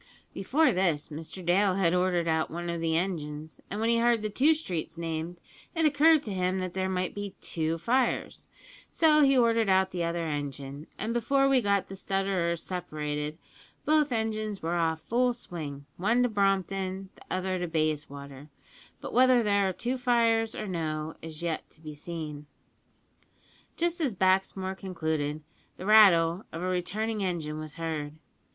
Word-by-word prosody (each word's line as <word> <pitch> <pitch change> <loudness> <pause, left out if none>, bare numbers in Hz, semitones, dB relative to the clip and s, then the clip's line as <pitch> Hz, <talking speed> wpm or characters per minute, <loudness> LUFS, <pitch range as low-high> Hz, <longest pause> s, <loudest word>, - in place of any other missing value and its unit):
"Before 295 +11 +2
this 175 -5 0
Mr 160 +4 -7
Dale 185 +2 +3
had 185 -3 +2
ordered 180 -2 +1
out 160 -1 +1
one 170 +1 -4
o' 170 - -3
the 165 -1 +1
engines, 155 -4 -4
an' 205 - -4
when 225 +1 +1
he 235 0 +3
heard 235 -2 +3
the 215 - -2
two 295 +9 +4
streets 170 - -4
named 165 +1 -4 0.4
it 325 -1 +2
occurred 305 +1 +5
to 210 - -4
him 185 0 0
that 185 -1 -3
there 190 0 -1
might 185 -1 -1
be 205 -1 -6
two 160 0 -2
fires, 245 +8 0 0.4
so 310 -2 +4
he 275 -2 +5
ordered 230 -3 +3
out 190 0 +3
the 175 -1 -2
other 170 0 -1
engine; 145 -1 -5
and 225 +2 -2
before 275 +4 +2
we 270 -2 +4
got 200 -2 +1
the 195 - -8
stutterers 190 -4 -1
separated 150 -4 -4 0.5
both 305 -2 +3
engines 215 -3 -2
were 165 +1 -1
off 165 -2 0
full 245 +1 +1
swing, 150 - -7
one 225 +7 +2
to 245 - +2
Brompton, 195 -2 -1
the - - -22
other 185 0 -1
to 175 - -2
Bayswater; 145 -3 -3 0.5
but - - -7
whether 255 -1 +5
there 200 -2 +2
are - - -1
two 245 +7 -3
fires 230 -2 +2
or - - -4
no 160 -3 -3
is 160 0 -8
yet 165 -2 -3
to - - -17
be 155 -1 -8
seen." 150 -1 -7 1.3
Just 345 +1 0
as 265 -9 0
Baxmore 190 0 +1
concluded, 155 -5 -3 0.3
the 185 - -7
rattle 190 -4 +6
of 165 +2 -5
a - - -1
returning 210 +4 -2
engine 160 -5 -3
was 155 -1 -7
heard. 160 -3 -4
185 Hz, 170 wpm, -28 LUFS, 160-220 Hz, 1.3 s, rattle